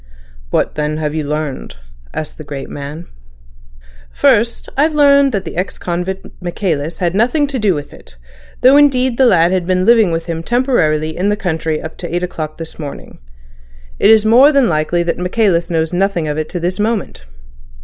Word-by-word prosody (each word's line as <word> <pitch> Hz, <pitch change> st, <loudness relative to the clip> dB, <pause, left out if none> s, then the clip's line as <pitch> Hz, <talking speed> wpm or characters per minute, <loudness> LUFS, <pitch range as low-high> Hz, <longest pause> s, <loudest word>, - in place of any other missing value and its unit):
"What -, -, 0 dB
then 150 Hz, 0 st, -2 dB
have 150 Hz, -1 st, -2 dB
you 155 Hz, -1 st, -2 dB
learned?" 150 Hz, -, -4 dB, 0.4 s
asked 155 Hz, +1 st, -6 dB
the -, -, -7 dB
great 140 Hz, -2 st, -7 dB
man. 145 Hz, +4 st, -7 dB, 1.1 s
"First, 210 Hz, -, +1 dB
I've 305 Hz, +3 st, +1 dB
learned 280 Hz, -2 st, +5 dB
that 195 Hz, -5 st, -3 dB
the -, -, -7 dB
ex 180 Hz, +3 st, -3 dB
convict 180 Hz, +2 st, -4 dB, 0.2 s
Michaelis 170 Hz, -4 st, -3 dB
had 175 Hz, -2 st, -1 dB
nothing 245 Hz, +9 st, +2 dB
to 275 Hz, -2 st, -4 dB
do 205 Hz, -5 st, +2 dB
with 145 Hz, -1 st, -7 dB
it, -, -, -15 dB, 0.5 s
though 260 Hz, +3 st, +6 dB
indeed 260 Hz, -4 st, +3 dB
the 260 Hz, -, +6 dB
lad 170 Hz, -5 st, +4 dB
had 185 Hz, -2 st, -1 dB
been 185 Hz, 0 st, +1 dB
living 225 Hz, -4 st, +5 dB
with 165 Hz, 0 st, -2 dB
him 165 Hz, -1 st, -4 dB
temporarily 160 Hz, -, 0 dB
in 190 Hz, +3 st, 0 dB
the 210 Hz, -, 0 dB
country 160 Hz, -5 st, -2 dB
up 160 Hz, -, -8 dB
to 175 Hz, -, -7 dB
eight 175 Hz, -, -1 dB
o'clock 155 Hz, -4 st, -5 dB
this 165 Hz, 0 st, -9 dB
morning. 145 Hz, -3 st, -8 dB, 0.8 s
It -, -, +4 dB
is 220 Hz, -1 st, +5 dB
more 250 Hz, +7 st, +6 dB
than 275 Hz, -4 st, +3 dB
likely 170 Hz, +1 st, 0 dB
that 170 Hz, 0 st, -2 dB
Michaelis 180 Hz, -2 st, +1 dB
knows 160 Hz, 0 st, -1 dB
nothing 180 Hz, -3 st, 0 dB
of 150 Hz, -, -2 dB
it 155 Hz, 0 st, -3 dB
to 175 Hz, -, -4 dB
this 180 Hz, +3 st, -2 dB
moment." 210 Hz, -, -2 dB
175 Hz, 190 wpm, -16 LUFS, 155-225 Hz, 1.1 s, though